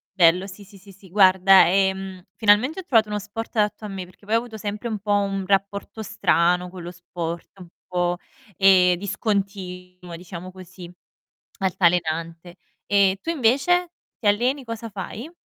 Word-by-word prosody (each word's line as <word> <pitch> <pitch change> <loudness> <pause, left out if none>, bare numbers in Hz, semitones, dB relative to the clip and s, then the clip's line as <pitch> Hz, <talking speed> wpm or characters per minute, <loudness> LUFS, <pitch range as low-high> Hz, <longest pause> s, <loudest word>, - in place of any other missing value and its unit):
bello, 180 +1 +4
sì, 200 +1 -11
sì, 200 0 -16
sì, 195 +1 -16
sì. 195 0 -18
Guarda, 190 0 +6
ehm, 190 0 0
finalmente 220 - +3
ho - - -6
trovato 225 -9 +3
uno 210 0 -2
sport 220 +4 -7
adatto 210 0 0
a - - -4
me, 195 -2 -6
perché 185 +3 -21
poi 215 +2 0
ho - - +6
avuto 230 -2 -9
sempre 210 +2 -5
un 220 -2 -3
po' 205 +1 -4
un 195 -1 0
rapporto 200 +2 -1
strano 180 -4 +1
con 180 -1 -10
lo 175 - -7
sport, 170 +1 -7
un 180 - -11 0.2
po', 175 0 -1 0.4
ehm, 185 -2 +5
discontinuo, 190 -3 -4
diciamo 180 +1 -9
così, 180 -1 -12 0.7
altalenante. 170 -2 -1 0.3
Ehm, 200 -2 +3
tu 330 - -3
invece 330 +6 +2 0.3
ti 220 - -6
alleni? 245 +7 +1
Cosa 230 -1 -7
fai? 210 - -7
195 Hz, 165 wpm, -23 LUFS, 180-210 Hz, 0.7 s, Guarda